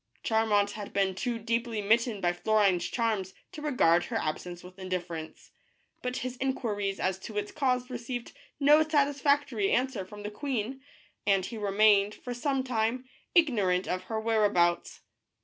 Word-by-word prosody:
Charmant 215 -2 +2
had 205 -1 -7
been 195 -1 +1
too 235 +5 -2
deeply 230 0 -1
mitten 220 +1 +2
by 175 0 +2
Florine's 190 -2 +2
charms 215 -6 -1 0.2
to 305 - -8
regard 175 - +3
her - - -5
absence 175 +3 -3
with 180 +1 -13
indifference. 175 -4 -5 0.5
But 250 0 -3
his 255 0 -4
inquiries 210 -7 -2
as 190 0 -1
to 210 +2 -7
its 210 0 -2
cause 250 -4 0
received 245 -1 -5 0.3
no 295 +2 +6
satisfactory 285 -6 +2
answer 250 -5 0
from 205 +2 -11
the 210 - -4
queen, 265 +1 -3 0.5
and 195 -2 +3
he 235 - -6
remained, 205 0 +3
for 245 - -6
some 270 +2 -1
time, 250 +1 -1 0.3
ignorant 205 - +3
of 185 0 -2
her 220 +2 -2
whereabouts. 205 -6 +1
220 Hz, 150 wpm, -29 LUFS, 195-250 Hz, 0.5 s, no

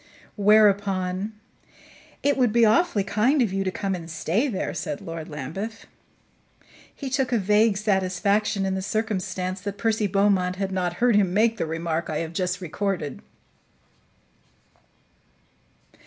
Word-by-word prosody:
Whereupon 200 -2 +3 0.9
"It 285 0 +3
would 250 -4 +2
be 235 +1 +5
awfully 220 - +3
kind 215 +9 +2
of 225 -7 +1
you 195 0 0
to 190 - -1
come 195 +1 -2
and 170 -2 -6
stay 185 - 0
there," 210 -8 -3
said 150 -4 -4
Lord 165 -1 -7
Lambeth. 165 - -6 1.1
He 280 - -6
took 265 -1 0
a 240 - +3
vague 210 +1 +3
satisfaction 200 0 +1
in 190 - -1
the 190 - -2
circumstance 190 -3 -2
that 200 0 -5
Percy 220 -1 +1
Beaumont 195 -2 +2
had 195 0 -3
not 180 -2 -1
heard 240 +4 +2
him 195 -3 +2
make 225 +2 +3
the 165 - -2
remark 165 +1 -2
I 155 - -2
have 165 +1 -4
just 180 +1 -2
recorded. 180 -3 -3
195 Hz, 140 wpm, -24 LUFS, 180-215 Hz, 1.1 s, be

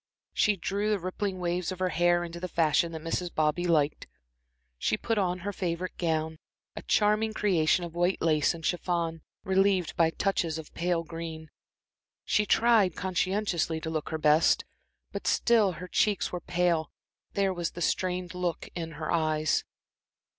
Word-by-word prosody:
She 210 - +3
drew 200 +3 -2
the 210 - +2
rippling 185 +1 -3
waves 175 0 -1
of 185 - -5
her 185 0 0
hair 175 +1 +2
into 170 0 -7
the 185 - -4
fashion 165 -1 +2
that 160 -1 -7
Mrs. 175 +1 -2
Bobby 155 +3 +1
liked, 155 -3 +1 0.7
she - - +1
put 225 -2 -1
on 180 -2 0
her 205 - -2
favorite 180 -1 -3
gown, 160 -2 -1 0.4
a - - -5
charming 215 +1 +2
creation 175 -4 +2
of 170 - -9
white 175 +2 +1
lace 155 0 +2
and 165 -1 -8
chiffon, 170 -2 -1 0.2
relieved 190 -2 +2
by 165 -1 +4
touches 165 -3 -1
of 160 -2 -9
pale 170 -1 0
green; 160 -1 -7 0.7
she 210 0 +2
tried 220 -4 +4
conscientiously 185 -3 0
to 160 0 -5
look 155 -2 -3
her 160 - -2
best, 155 +1 +4 0.5
but - - -5
still 220 -5 +3
her 180 +2 -8
cheeks 205 +2 +1
were 180 - -4
pale, 170 -2 0 0.4
there 195 -1 +1
was 175 -2 -2
the - - -8
strained 180 0 -1
look 180 -2 -3
in 165 -2 -5
her 155 0 -4
eyes. 155 -2 +1
175 Hz, 165 wpm, -28 LUFS, 160-185 Hz, 0.7 s, by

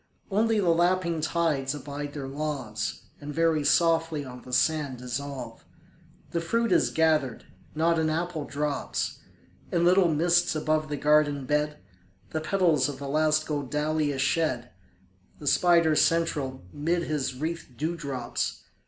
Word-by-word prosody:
Only 220 +2 +2
the 185 -4 +2
lapping 170 -1 +2
tides 150 -4 0
abide 145 +1 -6
their 140 -3 -5
laws, 135 -7 -4 0.2
And 145 0 -7
very 160 -1 +2
softly 165 -2 +2
on 125 -1 -9
the 125 - -12
sand 140 +1 +1
dissolve. 125 -1 -6 0.7
The 170 - -1
fruit 230 +7 0
is - - +4
gathered 155 -6 +1 0.3
not 165 +1 +2
an 160 0 +1
apple 160 -1 -2
drops: 145 0 -2 0.5
In 170 -1 +2
little 180 +1 +5
mists 170 +2 +2
above 155 0 0
the 145 - -2
garden 145 -2 +3
bed 150 +1 0 0.5
The 160 - -2
petals 160 -6 +2
of 140 - -6
the 140 +1 -6
last 155 +2 +2
gold 145 -4 -3
dahlia 150 -1 0
shed; 130 -3 0 0.7
The 150 - -11
spider 170 +2 +4
central 150 - +1
'mid 170 +4 0
his 145 -5 -2
wreathed 155 -3 -5
dewdrops! 140 -5 -3
150 Hz, 140 wpm, -27 LUFS, 140-165 Hz, 0.7 s, little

